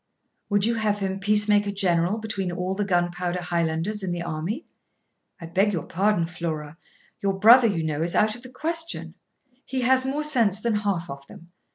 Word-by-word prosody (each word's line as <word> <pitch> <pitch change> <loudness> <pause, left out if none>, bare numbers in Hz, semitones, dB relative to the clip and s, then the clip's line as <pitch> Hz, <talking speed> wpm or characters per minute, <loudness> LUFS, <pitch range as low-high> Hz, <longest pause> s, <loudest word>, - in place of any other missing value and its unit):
'Would 205 -1 +2
you 230 - +1
have 215 -2 0
him 195 -1 -3
peacemaker 205 0 +3
general 185 -1 +1
between 210 -5 -3
all 180 +1 -2
the 205 +2 -1
gunpowder 175 -1 -1
Highlanders 170 +3 -1
in 190 -2 -3
the 175 0 -3
army? 170 - -4 0.7
I 165 - -8
beg 195 +5 +1
your 165 -5 -2
pardon, 195 -1 +1
Flora, 160 -3 -5 0.5
your 195 -1 +1
brother, 230 +4 +7
you 175 -7 -1
know, 155 -1 -2
is 170 +1 -1
out 215 0 +3
of 245 - -12
the 255 - -11
question; 330 +5 -3 0.5
he 260 -1 -3
has 260 +1 +4
more 275 +3 -2
sense 230 -10 +2
than 225 -1 0
half 200 -5 -2
of 140 0 -10
them. 170 +1 -15
195 Hz, 185 wpm, -24 LUFS, 175-215 Hz, 0.7 s, brother